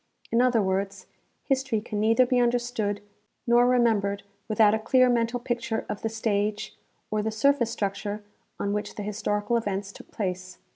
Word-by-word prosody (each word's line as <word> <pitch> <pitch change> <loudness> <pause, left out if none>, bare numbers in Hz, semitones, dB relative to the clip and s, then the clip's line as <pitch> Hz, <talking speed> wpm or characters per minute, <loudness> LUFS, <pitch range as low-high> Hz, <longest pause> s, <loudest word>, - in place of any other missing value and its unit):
In 230 - +4
other 245 -4 +3
words, 195 0 -2 0.4
history 265 -5 0
can 210 0 -5
neither 225 +4 +4
be 250 0 +2
understood 240 -4 0 0.4
nor 240 +1 +5
reinembered 220 -5 +2 0.2
without 215 -1 +4
a 220 - +1
clear 255 +3 +4
mental 235 0 +1
picture 235 -2 -2
of 210 - -5
the 225 - -1
stage, 215 -1 -1 0.4
or 215 0 +1
the 220 - -1
surface 235 +2 +2
structure, 205 -1 -3 0.4
on 200 - -1
which 210 0 -3
the 210 - -5
historical 210 +2 -1
events 200 -3 -3
took - - -14
place. 185 -2 -4
220 Hz, 160 wpm, -26 LUFS, 205-240 Hz, 0.4 s, nor